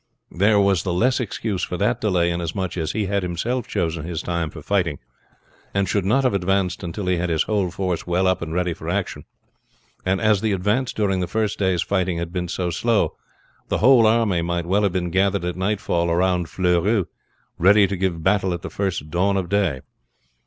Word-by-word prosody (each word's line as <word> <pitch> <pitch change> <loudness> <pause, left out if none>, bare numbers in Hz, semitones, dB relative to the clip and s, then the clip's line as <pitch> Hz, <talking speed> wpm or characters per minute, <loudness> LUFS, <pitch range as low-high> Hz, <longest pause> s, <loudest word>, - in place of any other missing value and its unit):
There 100 +4 +3
was 100 -4 +3
the 90 -1 -2
less 125 +8 +2
excuse 110 -4 -3
for 90 - -3
that 105 +7 0
delay, 90 -5 +2
inasmuch 85 +2 -3
as 80 -3 -2
he 110 -2 -1
had 100 +1 0
himself 105 +8 -2
chosen 80 -2 -2
his 85 -1 -4
time 85 -2 -2
for 75 -2 -11
fighting, 90 -6 0 0.8
and 100 -1 +1
should 100 +1 0
not 130 +8 +2
have 130 - +2
advanced 95 -1 0
until 90 +2 -5
he 90 -1 +1
had 90 +1 -1
his 80 -2 +2
whole 100 -4 0
force 90 -1 -3
well 90 +2 +1
up 95 0 +1
and 80 -1 -5
ready 90 0 0
for 80 0 -7
action; 95 +1 -3 0.8
and 95 +1 +1
as 110 -3 +3
the 110 -2 +1
advance 105 +7 0
during 100 -3 0
the 90 - -1
first 110 +2 -1
day's 95 -4 +1
fighting 95 -3 0
had 85 0 -4
been 90 -1 -2
so 90 +1 -2
slow, 115 +5 +1 0.5
the - - 0
whole 120 -1 +6
army 110 -6 +2
might 85 0 -2
well 95 +4 +2
have 100 -2 +2
been 90 -2 -1
gathered 95 +1 +1
at 90 - -2
nightfall 95 -3 0
round 90 -1 +1
Fleurus 90 +3 +1 0.5
ready 100 +4 +6
to 100 +1 -2
give 90 -3 -2
battle 95 -1 +2
at 85 - -9
the - - -6
first 95 -7 -3
dawn 95 +3 +1
of 90 -3 -2
day. 95 -10 +1
95 Hz, 205 wpm, -22 LUFS, 85-100 Hz, 0.8 s, whole